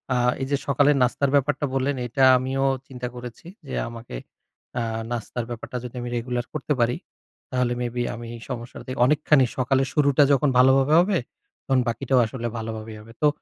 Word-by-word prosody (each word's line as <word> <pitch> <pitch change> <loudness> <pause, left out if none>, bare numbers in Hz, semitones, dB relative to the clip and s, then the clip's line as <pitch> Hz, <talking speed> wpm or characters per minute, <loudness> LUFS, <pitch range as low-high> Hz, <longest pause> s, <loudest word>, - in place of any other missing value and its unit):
আ - - +2 0.2
এই - - 0
যে 140 - +3
সকালের 145 +1 +4
নাস্তার 135 +3 +1
ব্যাপারটা 145 +1 +1
বললেন, 135 +1 0
এইটা 130 +3 0
আমিও 130 +2 -1 0.2
চিন্তা 125 -2 -5
করেছি 125 +5 -9 0.2
যে - - -4
আমাকে 115 - -9 0.6
আ - - 0 0.3
নাস্তার 120 0 -3
ব্যাপারটা 120 +1 -5
যদি 125 0 -8
আমি 120 - -4
রেগুলার 120 0 -2
করতে 155 -1 -1
পারি, 120 +1 +2 0.5
তাহলে 125 -1 +1
may 120 - -1
be 120 - 0
আমি 115 0 -8 0.2
সমস্যাটা 120 -1 -6
থে 130 - -3
অনেকখানি 150 -1 +4
সকালের 135 +1 +2
শুরুটা 145 -1 +4
যখন 140 +1 +3
ভালোভাবে 135 +3 +5
হবে, 185 +2 +3 0.5
তখন 135 -1 +2
বাকিটাও 130 +2 +1
আসলে 120 +1 -4
ভালোভাবেই 110 -1 -6
হবে। 115 +2 -14
তো 150 - +5
130 Hz, 175 wpm, -24 LUFS, 120-140 Hz, 0.6 s, ভালোভাবে